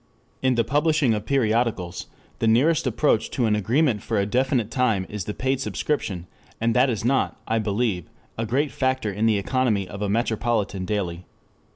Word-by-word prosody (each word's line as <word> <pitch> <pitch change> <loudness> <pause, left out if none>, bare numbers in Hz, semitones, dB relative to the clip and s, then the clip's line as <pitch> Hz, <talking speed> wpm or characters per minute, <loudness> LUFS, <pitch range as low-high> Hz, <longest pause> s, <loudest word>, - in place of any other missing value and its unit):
In 130 -1 +2
the 115 - +3
publishing 145 +1 +2
of 105 0 -4
periodicals 115 -8 0 0.3
the 115 - +1
nearest 135 +7 +3
approach 120 -2 +1
to 125 - 0
an 105 -1 +2
agreement 115 +2 +1
for 110 - -2
a 100 - +1
definite 125 0 0
time 115 -7 +1
is 105 -4 -5
the 105 - -3
paid 130 0 0
subscription, 100 - -2 0.3
and 115 0 +1
that 130 +2 +4
is 110 -2 -2
not, 135 +2 +1
I 115 0 +1
believe, 105 -4 -1 0.3
a 115 0 -3
great 140 +6 0
factor 130 -5 0
in 105 +3 +1
the 110 -2 +3
economy 105 -2 0
of 100 +2 -8
a 105 - -1
metropolitan 110 -3 0
daily. 90 -4 -3
115 Hz, 180 wpm, -24 LUFS, 105-130 Hz, 0.3 s, that